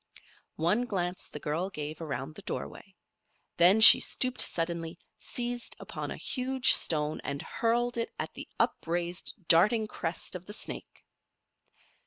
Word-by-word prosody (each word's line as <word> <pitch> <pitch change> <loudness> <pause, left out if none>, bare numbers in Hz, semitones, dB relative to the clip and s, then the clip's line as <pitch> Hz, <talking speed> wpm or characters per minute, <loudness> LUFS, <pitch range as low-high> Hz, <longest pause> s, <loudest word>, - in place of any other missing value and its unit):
One 195 +10 0
glance 180 -5 -3
the 150 - -8
girl 160 +6 -3
gave 155 -2 -7
around 140 -2 -5
the 200 - -12
doorway. 195 -1 -7 0.6
Then 180 +5 +5
she 220 - +12
stooped 255 -1 -1
suddenly, 165 -1 -3 0.2
seized 240 0 -5
upon - - -7
a - - -6
huge 260 0 +2
stone 150 -1 +2
and 140 0 -5
hurled 240 +1 -1
it 230 - -2
at - - -5
the - - -9
upraised, 175 +2 -2
darting 210 +7 +4
crest 175 -5 -4
of 180 -1 -6
the 205 - -7
snake. - - -7
180 Hz, 140 wpm, -29 LUFS, 165-230 Hz, 0.6 s, she